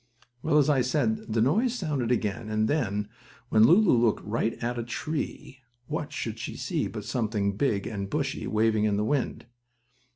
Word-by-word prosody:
Well, 150 - +2
as 145 - +4
I 145 -4 +3
said, 120 -4 0
the 110 0 +2
noise 225 - +2
sounded 145 - -1
again, 110 -1 -1
and 110 0 +1
then, 105 -8 0 0.4
when 110 0 +6
Lulu 185 - +6
looked 115 -2 +2
right 115 +2 0
at 120 +1 -3
a - - -2
tree, 135 +1 -4 0.3
what - - -4
should - - -4
she - - -5
see - - -1
but - - -7
something 105 -4 -1
big 105 -5 0
and 100 -3 -4
bushy, - - -2
waving 110 0 +2
in 105 -1 +1
the 105 - +1
wind. 135 -1 -1
115 Hz, 175 wpm, -27 LUFS, 110-140 Hz, 0.4 s, when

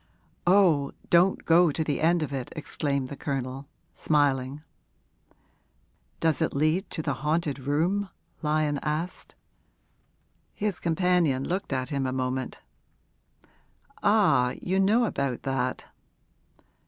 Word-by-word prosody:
'Oh, 175 -7 +4 0.2
don't 175 +3 +4
go 170 +1 +5
to 160 +2 -1
the 150 -2 -2
end 165 +1 +3
of 140 -2 -5
it!' 130 -2 -4
exclaimed 140 -3 -2
the 140 - -6
Colonel, 135 -1 -4 0.3
smiling. 145 -1 0 1.6
'Does 160 -3 +1
it - - 0
lead 155 +7 +1
to 160 - -4
the - - 0
haunted 150 -2 0
room?' 165 +9 0 0.3
Lyon 150 -2 0
asked. 155 +4 -4 1.2
His 205 -4 -1
companion 170 -5 +1
looked 185 -1 -3
at 130 -1 -2
him 140 -2 -1
a - - -2
moment. 130 0 -3 1.4
'Ah, 125 0 +3
you 190 +1 -1
know 215 +5 +4
about 140 - -2
that?' 130 -1 -2
150 Hz, 115 wpm, -27 LUFS, 135-175 Hz, 1.6 s, go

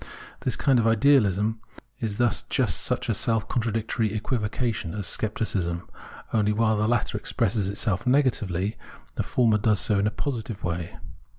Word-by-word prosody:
This - - -1
kind 135 -3 +3
of 115 - +2
idealism 110 -3 +3 0.4
is 105 -3 -3
thus 120 -3 +2
jiist - - +1
such - - 0
a - - +1
self 115 -1 0
contradictory 115 -2 -1
equivocation 110 -4 -2
as 100 -2 -3
scepticism; 95 -4 -1 0.5
only, 105 -1 +2
while 110 +1 +2
the 105 +1 +1
latter 120 -2 0
expresses 100 -1 0
itself 100 +1 -1
negatively, 110 -8 +1 0.4
the - - -2
former 115 -4 +2
does 105 0 +2
so 105 -3 +2
in 100 - +2
a - - +3
positive 115 -3 -4
way. 85 -1 -3
110 Hz, 155 wpm, -25 LUFS, 100-115 Hz, 0.5 s, kind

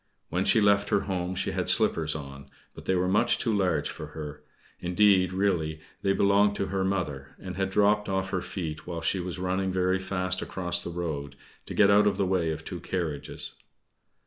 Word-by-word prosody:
When 90 +3 0
she 115 - +5
left 100 -1 +3
her 105 -2 +3
home 95 -2 -3
she - - -1
had - - 0
slippers 80 -2 +2
on, 70 -2 -8 0.2
but - - -12
they 95 - +2
were 90 0 +1
much 95 +3 +3
too 115 -4 0
large 90 -7 +1
for - - -7
her 75 -1 -6 0.4
indeed, 95 0 +3
really, 90 -5 0 0.2
they 95 - +2
belonged 100 +1 +3
to 100 - -1
her 95 -1 +1
mother 75 -9 -2
and 90 -1 -7
had 95 0 -1
dropped 105 +1 +2
off 95 0 -1
her 95 - 0
feet 80 -5 -5
while 85 -2 -4
she 95 +3 +1
was 90 +1 -4
running 95 +1 -1
very 95 0 +1
fast 95 -1 -1
across 90 -2 -1
the - - -5
road, 75 -5 -4 0.3
to - - -6
get 100 -1 +6
out 105 +1 +5
of 100 -2 +1
the 100 - +1
way 90 -3 +1
of 80 - -4
two - - -5
carriages. 80 -6 -4
95 Hz, 200 wpm, -27 LUFS, 85-100 Hz, 0.4 s, get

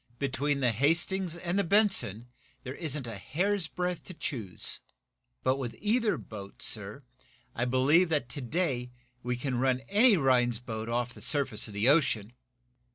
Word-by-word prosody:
"Between 140 +1 -1
the 125 -2 +3
'Hastings' 165 - +1
and 175 +2 -1
the - - +2
'Benson' 190 - +3 0.4
there 130 - -6
isn't 150 -4 -4
a 115 -4 -6
hair's 185 - -1
breadth 180 +1 -3
to 185 - -9
choose. 105 - -2 0.6
But 130 +1 +2
with 125 -4 -5
either 220 +1 +1
boat, 100 -2 -9
sir, 105 +5 -2 0.5
I 120 - -1
believe 140 +8 +3
that, 150 -6 0
to 145 - -5
day, 130 -3 -1 0.3
we 125 +1 -2
can 125 0 -2
run 130 0 +1
any 210 +1 +5
Rhinds 125 -5 +2
boat 115 -1 -6
off 120 +1 -1
the - - -12
surface 140 -8 +2
of 105 - -10
the 105 +4 +1
ocean!" 125 -7 +2
135 Hz, 160 wpm, -29 LUFS, 120-170 Hz, 0.6 s, any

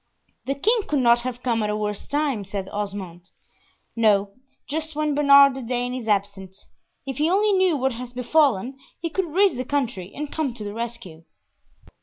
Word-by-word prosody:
"The 275 - 0
king 445 - +2
could 300 - 0
not 240 -2 +4
have 245 0 -6
come 235 -3 0
at 210 - -1
a 210 - -1
worse 210 -1 -4
time," 285 -7 -1
said 195 0 -5
Osmond. 195 -4 -6 0.7
"No, 205 -3 +2 0.3
just 315 +1 -3
when 305 -1 0
Bernard 280 -1 +7
the 265 - -6
Dane 245 +1 -2
is 250 -3 -5
absent. 195 -2 -2 0.5
If 270 -1 -5
he 310 +2 +2
only 410 +3 +3
knew 375 -5 +3
what 265 0 0
has 245 +1 -7
befallen, 255 -1 +1 0.2
he 335 -1 -4
could 380 +2 -1
raise 385 -2 +3
the 255 - -2
country, 245 -9 -2
and 295 0 -5
come 285 -7 -2
to 215 - -7
the 205 0 -5
rescue." 230 -8 -7
250 Hz, 185 wpm, -23 LUFS, 210-290 Hz, 0.7 s, Bernard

